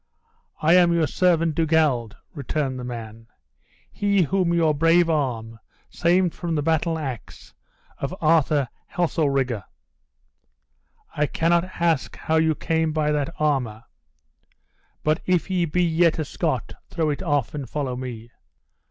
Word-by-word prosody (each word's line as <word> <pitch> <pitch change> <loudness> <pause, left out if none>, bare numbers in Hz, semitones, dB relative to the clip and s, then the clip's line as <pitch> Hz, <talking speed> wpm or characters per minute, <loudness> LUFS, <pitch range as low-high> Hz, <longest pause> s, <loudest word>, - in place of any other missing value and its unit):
"I 160 +2 +5
am 175 -1 +5
your 165 -2 +2
servant 165 +1 +2
Dugald," 155 -8 +1 0.2
returned 140 -2 -3
the - - -6
man; 115 -2 -8 0.6
"he 200 -2 +2
whom 180 +2 +1
your 165 -3 +3
brave 165 +3 +3
arm 115 -7 -2 0.3
saved 175 0 +2
from 170 -2 -3
the 150 - 0
battle 160 +1 +1
ax 135 -8 -7 0.5
of 140 +7 -3
Arthur 155 -3 +3 0.2
Heselrigge." 140 - 0 1.5
"I 150 0 +1
cannot 170 +3 +1
ask 165 -5 +1
you - - -14
how 160 - +1
you 160 -1 +2
came 160 0 0
by 150 -1 +1
that 150 +1 -1
armor; 130 -8 0 1.2
but 155 +1 +1
if 185 +1 +1
you 180 -2 +1
be 180 +4 +1
yet 165 -1 +2
a 155 - -2
Scot 145 -5 -2 0.2
throw 160 -3 0
it 145 - -4
off 145 - 0
and 140 -5 -6
follow 135 -3 -3
me." 120 -2 -7
155 Hz, 140 wpm, -23 LUFS, 135-170 Hz, 1.5 s, I